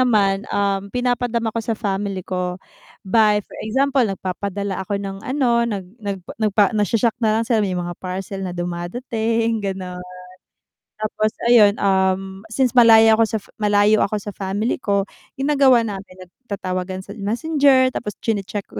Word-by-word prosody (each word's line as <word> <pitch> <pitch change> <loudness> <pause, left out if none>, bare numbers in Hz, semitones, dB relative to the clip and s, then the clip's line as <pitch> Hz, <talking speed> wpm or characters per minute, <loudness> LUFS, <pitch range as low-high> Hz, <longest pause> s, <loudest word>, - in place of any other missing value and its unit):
naman, 205 -5 +2
um, 200 0 -1
pinapadama 245 -1 -1
ko 230 - -2
sa 225 0 -3
family 195 -3 -3
ko, 180 -1 -3 0.5
by 210 0 +3
for - - -16
example 270 +5 +1
nag-papadala 195 -2 -2
ako 200 +2 -2
ng 195 -1 -6
ano, 250 -4 +1
nag 200 -4 -4 0.2
nag 200 -2 -3 0.2
nagpa 205 -1 +3
nag 210 -2 +1
shoshock 230 0 +2
na 220 -1 +2
lang 230 - 0
sila 225 -2 +1
may 190 -3 -1
mga 175 0 -3
parcel 190 +1 -5
na 180 -2 -5
dumadating 225 +6 -2
ganon. 185 -2 -5 1.0
Tapos 215 0 -1 0.2
ayun, 220 -4 +6
um, 190 -1 0
since 250 +3 +1
malayo 225 -2 +6
ako - - +6
sa 220 - -2 0.2
malayo 210 0 +3
ako 215 - +1
sa 205 0 -5
family 200 +6 -2
ko, 200 -4 +1 0.3
ginagawa 270 -3 +4
namin 195 -3 -7
nag-tatawagan 185 -2 -5
sa 200 - -11
Messenger 260 +4 +3
tapos 210 -4 -5
chine-check 205 -2 -2
ko - - -6
205 Hz, 155 wpm, -21 LUFS, 195-230 Hz, 1.0 s, ayun